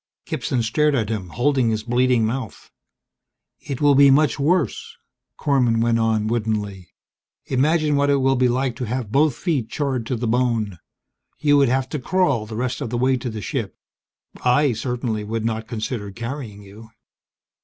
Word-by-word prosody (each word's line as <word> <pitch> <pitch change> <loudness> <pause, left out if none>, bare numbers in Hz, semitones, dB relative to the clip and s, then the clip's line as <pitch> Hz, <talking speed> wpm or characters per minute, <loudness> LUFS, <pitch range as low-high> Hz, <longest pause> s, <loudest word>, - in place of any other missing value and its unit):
Gibson 125 -3 -2
stared 150 +6 +2
at 110 -5 -1
him, 100 -5 -4
holding 130 +2 +1
his 110 -1 -1
bleeding 120 0 +2
mouth. 115 -1 -5 0.9
"It 135 -1 -6
will 145 -1 +5
be 140 0 +7
much 150 +2 +3
worse," 155 - 0 0.4
Korman 125 -6 +2
went 115 0 +2
on 110 -1 +1
woodenly. 105 -4 -2 0.6
"Imagine 150 +3 +1
what 140 0 +2
it 140 - +4
will 135 -1 +2
be 125 0 +3
like 125 0 0
to 125 - -3
have 120 -2 -4
both 145 +1 +3
feet 140 - -2
charred 130 -6 -2
to 130 - -1
the 120 +1 -3
bone. 115 -6 0 0.6
You 145 -1 +3
would 140 -3 +4
have 130 +1 0
to 150 - -3
crawl 140 -8 +1
the 110 - -7
rest 125 +4 -2
of 135 - -3
the 120 - -2
way 130 +2 +2
to 125 0 -4
the 110 -2 -6
ship; - - -4 0.7
I 130 +2 +3
certainly 120 -1 -3
would 110 +1 -3
not 110 -1 -2
consider 110 -2 -4
carrying 115 -1 -7
you!" 105 +3 -13
125 Hz, 175 wpm, -22 LUFS, 110-140 Hz, 0.9 s, be